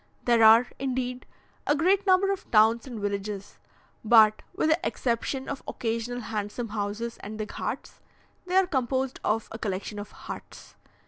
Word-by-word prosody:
There 235 -2 +4
are, 225 +2 +8
indeed, 255 -1 -3 0.4
a 290 - +4
great 380 +6 +2
number 380 +1 +4
of 395 0 -5
towns 225 +3 +4
and 240 -4 -6
villages, 200 0 -4 0.4
but, 215 -1 +6
with 320 - +1
the 315 - +3
exception 260 +2 -2
of 275 - -4
occasional 230 +1 -3
handsome 215 +1 -4
houses 210 +2 -3
and 215 +2 -8
the 215 - -2
ghauts, - - -5 0.5
they 365 - -1
are 380 0 +6
composed 265 -4 -1
of 220 +1 0
a 225 - -7
collection 205 0 -4
of 205 - -7
huts. - - -10
235 Hz, 155 wpm, -27 LUFS, 215-265 Hz, 0.5 s, are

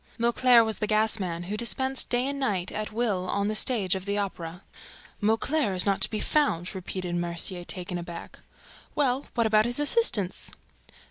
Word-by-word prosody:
Mauclair 235 0 +5
was 220 -2 -3
the 210 - -1
gas 215 0 +1
man, 175 -3 -3
who 195 +4 -4
dispensed 260 +4 0
day 245 +1 +1
and 280 0 -3
night 200 -10 -1
at 215 0 -4
will 210 -5 -1
on 200 +1 0
the 215 - -2
stage 210 -6 +2
of 190 -1 -3
the 200 0 -1
Opera. 180 -3 -5 0.6
"Mauclair 225 +1 +1
is 180 - +5
not 200 -1 +1
to - - +8
be 215 - -3
found!" 210 - 0
repeated 185 -1 -5
Mercier, 175 +1 -2
taken 180 0 -4
aback. 170 0 -9 0.6
"Well, 270 -2 0
what 230 -2 +2
about 215 0 +4
his 240 +3 -1
assistants?" 290 - +1
210 Hz, 180 wpm, -27 LUFS, 185-240 Hz, 0.6 s, to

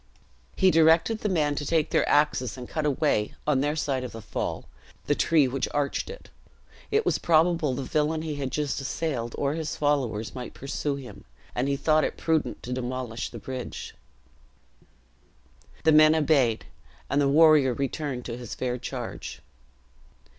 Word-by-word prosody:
He 190 -1 +4
directed 165 +7 +4
the 210 - -1
men 150 -5 +1
to 145 - -3
take 155 +1 0
their - - +2
axes, 140 -5 +2
and 125 -1 -7
cut 155 -1 -2
away, 140 -7 0
on 145 -3 +2
their 145 +2 0
side 140 -4 -1
of 125 - -6
the 115 - -7
fall, - - -4 0.4
the - - +2
tree 150 -1 +3
which 130 +1 -2
arched 145 - -1
it. 485 +1 -10 0.6
It 435 +1 +1
was - - +1
probable 165 -4 +2
the 135 - -3
villian 155 +3 0
he 155 -2 -3
had 135 -2 -2
just 145 0 -2
assailed, 130 -4 -3
or 140 0 0
his 160 -1 -3
followers, 130 -7 0
might 125 -1 -7
pursue 140 +1 -3
him; 135 -3 -10 0.3
and 125 +2 -1
he 140 0 0
thought 155 +2 +3
it - - -2
prudent 160 -2 -1
to 125 - -4
demolish 125 -2 -4
the 120 - -9
bridge. 130 +2 -6 1.9
The 160 - +5
men 155 +1 +7
obeyed, 140 -7 +2 0.4
and 140 +2 +1
the 140 - +3
warrior 150 -4 +5
returned 135 -1 -3
to 120 -1 -5
his 120 -3 -7
fair 125 -1 -2
charge. 125 -1 -6
145 Hz, 170 wpm, -26 LUFS, 125-155 Hz, 1.9 s, men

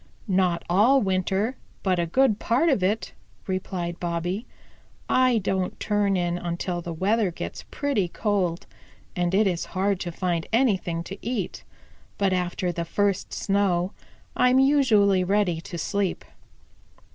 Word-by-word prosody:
"Not 185 -3 +1
all 220 +10 +5
winter, 195 +4 0 0.3
but 185 -3 +1
a 170 - 0
good 225 +3 +3
part 260 +9 +2
of 265 -9 +2
it," 205 +4 0 0.3
replied 180 -2 -3
Bobby. 175 +5 -2 0.6
"I 255 -2 +3
don't 190 -3 -1
turn 205 -2 +1
in 175 0 -1
until 175 0 -3
the 170 - -6
weather 195 +5 +1
gets 170 - -6
pretty 275 -11 0
cold, 180 -3 -1 0.5
and 175 +1 0
it 215 +2 +4
is 180 -3 0
hard 195 0 +1
to 175 - -4
find 170 -1 -2
anything 195 -9 +1
to 195 +3 -9
eat. 225 -6 -3 0.5
But 195 -2 +2
after 180 0 -1
the 170 0 -3
first 200 +3 0
snow 195 -2 +1 0.4
I'm 250 +1 +4
usually 230 -9 +4
ready 180 -3 +1
to 175 0 -7
sleep. 200 +1 -2
190 Hz, 140 wpm, -25 LUFS, 175-210 Hz, 0.6 s, all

